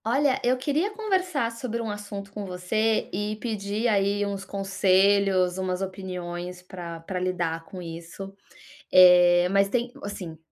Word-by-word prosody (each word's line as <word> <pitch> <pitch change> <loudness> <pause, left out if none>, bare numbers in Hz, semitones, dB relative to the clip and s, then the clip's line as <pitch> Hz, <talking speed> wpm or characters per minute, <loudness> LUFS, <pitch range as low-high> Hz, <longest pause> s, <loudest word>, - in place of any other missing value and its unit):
Olha, 270 +3 +2
eu 250 +1 +2
queria 295 +9 0
conversar 370 - 0
sobre 230 0 -4
um 225 -2 -3
assunto 205 -1 -7
com 205 0 -6
você 200 +4 0
e 210 +2 -2
pedir 215 0 -2
aí 205 -1 +1
uns 200 -1 -4
conselhos, 195 -1 +2
umas 185 -1 -2
opiniões 180 -2 -6
pra 170 -3 -8
pra 180 +2 -4
lidar 175 -3 -2
com 185 - -9
isso. 170 +4 -8 0.6
Eh, 180 -1 +7
mas 195 0 +3
tem 240 +3 -1
hum, - - -14
assim, 180 -5 -7
195 Hz, 150 wpm, -26 LUFS, 180-220 Hz, 0.6 s, Eh